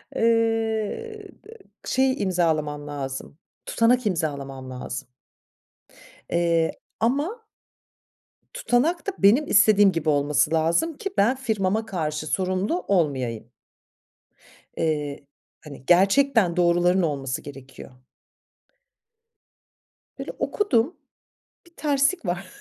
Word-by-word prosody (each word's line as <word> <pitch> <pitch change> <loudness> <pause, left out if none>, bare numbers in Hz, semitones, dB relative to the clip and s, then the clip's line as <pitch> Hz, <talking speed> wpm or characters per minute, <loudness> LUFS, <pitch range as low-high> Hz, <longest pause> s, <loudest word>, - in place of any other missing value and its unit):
Eee, 225 - 0 0.6
şey 260 -1 +1
imzalamam 155 -5 -1
lazım, 140 0 -6 0.3
tutanak 240 +1 +2
imzalamam 140 -7 -3
lazım. 130 +1 -6 1.2
Eee, 170 -1 +1 0.3
ama. 290 - -1 1.1
Tutanak 340 - 0
da 395 - -1
benim 240 +10 +4
istediğim 205 -2 +5
gibi 165 -2 -3
olması 145 +1 +2
lazım 170 - +1
ki 395 - -4
ben 240 +6 +3
firmama 220 -3 -1
karşı 155 -4 -3
sorumlu 185 - -1
olmayayım. 130 - -1 1.3
Eee, 150 -3 -2 0.4
hani, 140 -3 -12
gerçekten 195 +1 +3
doğruların 175 +1 +3
olması 135 -5 -2
gerekiyor. 135 -2 -12 2.2
Böyle - - -6
okudum, 325 - 0 0.7
bir 340 - -21
terslik 285 - +1
var 175 +2 -3
185 Hz, 90 wpm, -24 LUFS, 150-240 Hz, 2.2 s, istediğim